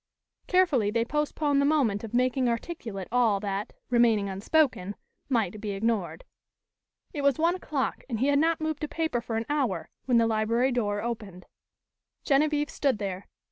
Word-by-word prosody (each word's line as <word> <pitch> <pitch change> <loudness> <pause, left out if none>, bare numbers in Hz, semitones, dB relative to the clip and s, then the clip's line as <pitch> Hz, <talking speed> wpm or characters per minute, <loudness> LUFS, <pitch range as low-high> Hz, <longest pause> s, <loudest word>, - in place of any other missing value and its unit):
Carefully 325 - +3
they 230 +2 0
postponed 295 +1 0
the - - +2
moment 260 -9 +2
of 225 - -6
making 255 +1 +2
articulate 230 - -4
all 230 -5 +3
that, 200 +1 -3 0.2
remaining 230 -4 +3
unspoken, 200 - +1 0.3
might 215 -5 0
be 210 -2 -3
ignored. 220 - -1 0.9
It 290 - -3
was 280 -2 +3
one 335 +2 +3
o'clock 305 -7 -3
and 230 -3 -2
he 260 - +2
had 285 0 +3
not 325 +1 +2
moved 315 -1 -3
a - - 0
paper 320 -6 -1
for 225 -1 -3
an 225 - -2
hour, 255 - -1
when 250 -2 +3
the 230 - +4
library 225 +3 +1
door 205 -4 -1
opened. 210 -6 -5 0.8
Genevieve 295 0 +2
stood 275 -5 +1
there. 195 -2 -5
240 Hz, 165 wpm, -27 LUFS, 210-290 Hz, 0.9 s, the